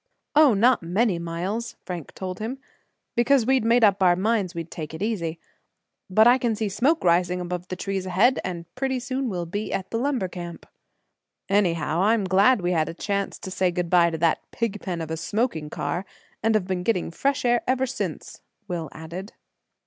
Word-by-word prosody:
"Oh! 295 -6 +6
not 240 +5 +4
many 180 +2 +1
miles," 180 +8 -3
Frank 175 -5 -6
told 185 -1 -5
him, 230 +5 -4 0.6
"because 240 +1 +3
we 265 +1 +4
made 230 +1 +3
up 200 -2 +4
our 180 -2 +5
minds 200 -2 0
we'd 165 0 -5
take 155 -1 -6
it 160 - -4
easy. 170 -7 -2 0.7
But 215 +4 +5
I 245 +2 +6
can 235 -3 0
see 215 -1 -2
smoke 270 - +1
rising 180 +1 +3
above 180 0 -4
the 185 - -4
trees 190 0 -3
ahead 205 +8 +3
and 175 -2 -5
pretty 265 0 -1
soon 260 0 -2
we'll 175 -4 -3
be 205 +5 -4
at 190 -1 -3
the 225 - -1
lumber 255 -6 0
camp." 175 -1 -8 0.8
"Anyhow, 170 -5 +1
I'm 215 +1 +3
glad 195 +5 +4
we 175 0 0
had 160 -3 +1
a - - -7
chance 200 +1 -2
to 190 - -8
say 185 -1 +1
good 175 -1 -3
by 175 -1 +5
to 165 - -4
that 165 0 +2
pigpen 195 -6 -3
of 160 -1 -5
a 160 - -2
smoking 165 -3 -1
car, 175 +4 -3 0.4
and 225 +1 +2
have 210 -4 +2
been 185 -1 -2
getting 180 -3 0
fresh 275 +9 0
air 240 0 +3
ever 260 +1 +2
since," 265 - -5 0.3
Will 170 -5 -4
added. 170 +6 -8
190 Hz, 195 wpm, -25 LUFS, 175-230 Hz, 0.8 s, Oh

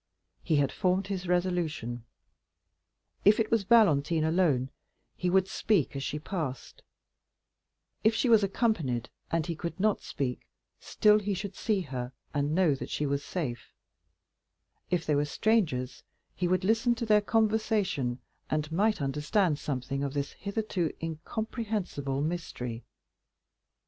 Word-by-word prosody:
He 160 - +1
had 145 -2 +2
formed 185 0 +1
his 190 -2 -4
resolution. 170 -10 -1 1.2
If 210 +3 +6
it 220 - 0
was 225 -4 +2
Valentine 165 -8 +4
alone, 160 -6 +2 0.4
he 180 - -1
would 190 +1 +3
speak 190 - +1
as 135 - -3
she 145 - -3
passed; 150 -5 -5 1.2
if 220 +1 +4
she 255 - +1
was 225 -3 +6
accompanied, 170 - 0 0.2
and 165 -1 0
he 170 -1 -3
could 170 +4 -5
not 215 +1 +2
speak, 125 -3 -3 0.4
still 210 0 +4
he 205 -1 -2
should 195 +1 -5
see 210 -3 0
her, 130 -5 -5 0.2
and 145 +1 0
know 180 -5 +4
that 135 - -6
she 150 - -1
was 140 0 -1
safe; 140 -8 -5 1.1
if 175 -2 0
they 150 - +1
were 145 0 +3
strangers, 150 - 0 0.3
he 180 - 0
would 185 +1 +1
listen 225 +4 +3
to 230 0 -3
their 210 -1 +5
conversation, 210 - +1 0.3
and 155 0 -1
might 205 -1 +1
understand 150 +4 +1
something 135 0 -3
of 140 0 -3
this 140 0 -1
hitherto 200 -5 -2
incomprehensible 170 - -3
mystery. 135 -8 -4
170 Hz, 140 wpm, -29 LUFS, 140-205 Hz, 1.2 s, If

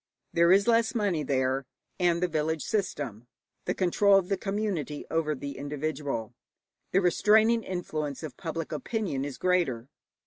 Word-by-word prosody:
There 170 +1 +5
is 200 +3 +5
less 230 +1 +3
money 200 -8 +1
there, 130 -1 0 0.3
and 175 -1 +2
the - - +3
village 160 -1 -1
system 135 - -3 0.4
the - - -1
control 195 +2 +4
of 185 -2 0
the 200 - +2
community 195 -7 -3
over 160 -2 0
the 140 0 -6
individual 145 -5 -3 0.6
the 195 - +3
restraining 215 +5 +4
influence 155 -7 -4
of 155 - -6
public 165 -1 -5
opinion 155 - -2
is 140 -2 -5
greater. 160 -10 0
165 Hz, 145 wpm, -28 LUFS, 145-195 Hz, 0.6 s, There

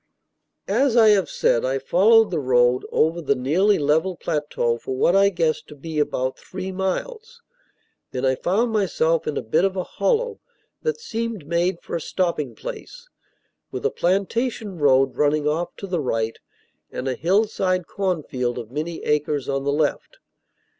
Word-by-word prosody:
As 265 -3 +2
I 220 -2 +7
have 200 -4 +3
said, 115 - +1
I 130 +1 0
followed 210 - +4
the 165 - 0
road 125 -2 +2
over 165 +2 +1
the 140 -3 +1
nearly 170 +11 +2
level 160 +6 +1
plateau 145 -8 -1
for 130 - -5
what 170 +7 +3
I 200 0 +5
guessed 165 -4 -1
to 150 - -11
be 155 +2 -5
about 130 -3 -1
three 190 0 -6
miles. 455 - -4 0.7
Then 130 +1 -3
I 130 - +3
found 205 - 0
myself 165 -6 +1
in 150 - -2
a - - -2
bit 155 +10 +1
of 195 -1 +1
hollow 460 - -1 0.4
that 465 -1 -2
seemed 230 - -4
made 170 +3 0
for - - -5
a 170 - -2
stopping 155 -11 -2
place, - - -9 0.6
with - - -6
a 445 - +2
plantation 200 +2 -1
road 135 -2 +3
running 150 0 +2
off 160 +3 -1
to - - -7
the 180 -4 -2
right, 115 -4 -2 0.5
and 130 - -4
a 130 - 0
hillside 185 - +1
cornfield 150 -12 -2
of 115 -2 -7
many 160 +4 -4
acres 150 -2 0
on 135 0 -2
the 140 - +1
left. 150 0 -1
170 Hz, 165 wpm, -23 LUFS, 140-200 Hz, 0.7 s, I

